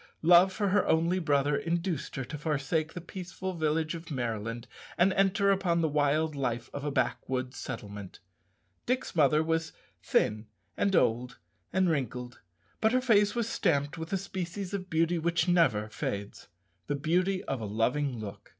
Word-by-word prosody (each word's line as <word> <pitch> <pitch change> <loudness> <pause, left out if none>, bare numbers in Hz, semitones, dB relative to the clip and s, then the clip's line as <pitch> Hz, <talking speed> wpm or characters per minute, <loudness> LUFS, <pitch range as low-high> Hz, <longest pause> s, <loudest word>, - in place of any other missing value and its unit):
Love 175 +3 +7
for 200 +1 -1
her 205 0 +3
only 170 +3 +2
brother 145 -3 +2
induced 170 -1 -2
her 135 - -3
to 150 - -7
forsake 155 +2 -1
the - - -5
peaceful 185 +2 -6
village 155 -1 0
of 165 0 -8
Maryland 115 -4 -3 0.3
and 185 +2 +4
enter 200 +1 +3
upon 185 -3 +1
the 160 - +2
wild 150 +1 +1
life 120 -3 -2
of 140 - -5
a 145 - -1
backwoods 130 -2 -1
settlement. 100 -3 -7 0.7
Dick's 255 -4 -1
mother 150 0 +4
was 160 0 -1 0.3
thin, 105 +1 +1 0.3
and 200 -1 +1
old, 125 0 +1 0.3
and 185 0 +2
wrinkled, 125 -5 -2 0.4
but 220 +1 +2
her 255 - +4
face 210 -5 +3
was 235 -2 0
stamped 145 -9 0
with 160 0 -7
a 195 - +1
species 190 0 -5
of 185 -2 -4
beauty 165 +1 +1
which 170 +2 +1
never 135 -13 +3
fades 100 -1 -5 0.4
the 145 - 0
beauty 180 +6 +1
of 135 -4 -3
a - - -3
loving 125 +6 0
look. 105 -2 -8
160 Hz, 165 wpm, -29 LUFS, 130-185 Hz, 0.7 s, Love